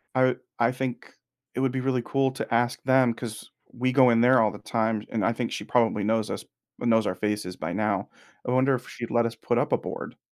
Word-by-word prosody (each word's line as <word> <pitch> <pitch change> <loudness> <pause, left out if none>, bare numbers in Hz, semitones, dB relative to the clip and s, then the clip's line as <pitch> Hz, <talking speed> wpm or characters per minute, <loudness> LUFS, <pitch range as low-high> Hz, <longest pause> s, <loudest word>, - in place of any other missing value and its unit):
I 130 0 +4 0.2
I 115 0 +3
think 125 -1 -5 0.4
it - - -2
would 135 -1 +1
be 130 0 -2
really 130 -1 0
cool 135 -1 +1
to 130 - -5
ask 120 +1 +1
them 130 -2 +4
'cause 115 -2 -8 0.2
we 130 +1 0
go 130 -1 +6
in 115 -1 +4
there 125 0 +6
all 110 -2 +3
the 105 - -10
time, 110 0 -1
and 110 -4 -1
I 115 - +2
think 115 0 -3
she - - -4
probably 115 -4 +2
knows 110 +1 +1
us - - -5 0.3
knows 115 -2 +2
our 90 - -1
faces 105 -2 -2
by 85 0 -4
now. 105 -2 -1 0.4
I - - 0
wonder 130 +1 +3
if 125 - -8
she'd 120 -1 -6
let 120 0 +3
us 115 0 -3
put - - -1
up - - 0
a - - +4
board - - -7
120 Hz, 240 wpm, -26 LUFS, 110-130 Hz, 0.4 s, go